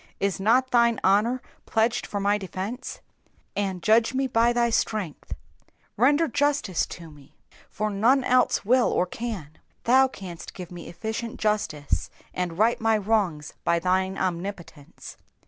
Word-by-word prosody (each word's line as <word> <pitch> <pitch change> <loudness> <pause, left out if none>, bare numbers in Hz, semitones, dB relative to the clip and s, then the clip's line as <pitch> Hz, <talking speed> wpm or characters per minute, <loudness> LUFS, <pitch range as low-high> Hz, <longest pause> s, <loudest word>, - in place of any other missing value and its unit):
Is 195 -1 -1
not 245 +6 +3
thine 235 -2 +3
honour 220 +6 +2 0.2
pledged 225 +2 +1
for 205 - -3
my 205 +1 +1
defence? 195 +6 -6 0.3
^*' - - -37 0.2
And 190 -3 -2
judge 225 +3 +3
me 270 +1 +1
by 235 -2 +3
thy 240 -1 +1
strength.'''' 205 -8 -2 0.6
Render 290 +8 +3
justice 285 - 0
to 165 -2 -10
me, 145 -2 -18 0.3
for 215 +1 -2
none 240 +7 +3
else 250 -4 +2
will 250 +3 +4
or 180 - +2
can. 185 -7 -6 0.2
Thou 265 +3 +5
canst 180 -9 -9
give 180 -2 -8
me 175 -1 -9
efficient 220 +6 -5
justice, 210 -9 -1 0.2
and 175 -2 -3
right 225 +3 +2
my 225 -1 +3
wrongs 195 -8 -1
by 170 - +2
thine 185 +2 0
omnipotence. 175 -4 -5
210 Hz, 145 wpm, -25 LUFS, 180-235 Hz, 0.6 s, Thou